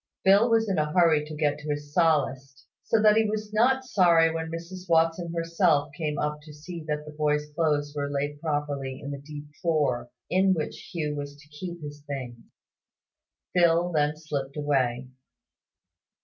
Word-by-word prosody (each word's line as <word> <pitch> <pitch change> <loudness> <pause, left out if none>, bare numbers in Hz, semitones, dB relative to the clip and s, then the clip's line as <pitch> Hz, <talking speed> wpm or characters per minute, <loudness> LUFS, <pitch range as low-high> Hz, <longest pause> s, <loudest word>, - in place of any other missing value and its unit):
Phil 200 +5 +6
was 225 -1 +3
in 190 -5 0
a 150 0 0
hurry 165 -4 +4
to 155 0 -8
get 150 -1 0
to 150 0 -7
his 145 0 -4
Sallust; 140 -5 +1 0.2
so 225 - +1
that 210 0 +6
he 220 - +4
was 215 0 -4
not 260 +5 +3
sorry 170 -7 +4
when 160 0 -3
Mrs 175 +2 -8
Watson 165 +1 +2
herself 165 -3 +1
came 150 -2 -2
up 150 0 -2
to 150 0 -13
see 165 +2 -8
that 150 0 -2
the 150 - -8
boy's 150 0 0
clothes 145 -2 0
were 140 -1 -2
laid 145 +1 -3
properly 145 -4 -2
in 140 -1 -6
the 140 - -5
deep 145 0 -9 0.2
drawer 140 -8 0 0.2
in 190 +1 +3
which 155 -2 -5
Hugh 155 -3 -2
was 145 0 -6
to 145 +1 -18
keep 170 +2 -7
his 145 0 -8
things. 130 -4 -5 1.1
Phil 175 0 +3
then 150 -1 +1
slipped 145 -3 -5
away. 130 -4 0
150 Hz, 175 wpm, -27 LUFS, 145-170 Hz, 1.1 s, Phil